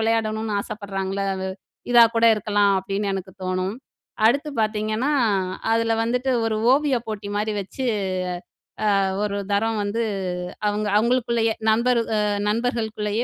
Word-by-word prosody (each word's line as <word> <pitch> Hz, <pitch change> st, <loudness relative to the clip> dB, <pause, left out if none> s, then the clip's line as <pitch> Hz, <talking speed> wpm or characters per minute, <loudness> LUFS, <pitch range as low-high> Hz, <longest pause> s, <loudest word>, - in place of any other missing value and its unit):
விளையாடணும்னு 220 Hz, -1 st, 0 dB
ஆசப்படுறாங்கல்ல 195 Hz, -2 st, -4 dB
அது, 190 Hz, 0 st, -3 dB, 0.4 s
இதா 235 Hz, -1 st, +9 dB
கூட 230 Hz, -, +3 dB
இருக்கலாம்." 205 Hz, -1 st, +2 dB
அப்படின்னு 195 Hz, +1 st, -2 dB
எனக்கு 190 Hz, -1 st, -6 dB
தோணும். 185 Hz, +3 st, -2 dB, 0.5 s
அடுத்து 280 Hz, +6 st, +2 dB
பார்த்தீங்கன்னா 215 Hz, +4 st, 0 dB, 0.6 s
அதுல 230 Hz, 0 st, +2 dB
வந்துட்டு 250 Hz, +3 st, 0 dB
ஒரு 220 Hz, -1 st, 0 dB, 0.2 s
ஓவிய 285 Hz, -2 st, +2 dB
போட்டி 210 Hz, -2 st, -5 dB
மாரி 215 Hz, +1 st, -1 dB
வச்சு, 200 Hz, +7 st, -5 dB, 1.1 s
அ -, -, +3 dB, 0.2 s
ஒரு 205 Hz, -1 st, -1 dB
தரம் 220 Hz, +2 st, +1 dB
வந்து 205 Hz, +3 st, -1 dB, 0.7 s
அவுங்க 210 Hz, 0 st, -1 dB
அவுங்களுக்குள்ளயே 235 Hz, -1 st, +2 dB, 0.2 s
நண்பர் 235 Hz, +2 st, +3 dB, 0.2 s
அ -, -, +2 dB, 0.3 s
நண்பர்களுக்குள்ளயே 220 Hz, -1 st, -1 dB
215 Hz, 120 wpm, -23 LUFS, 205-230 Hz, 1.1 s, இதா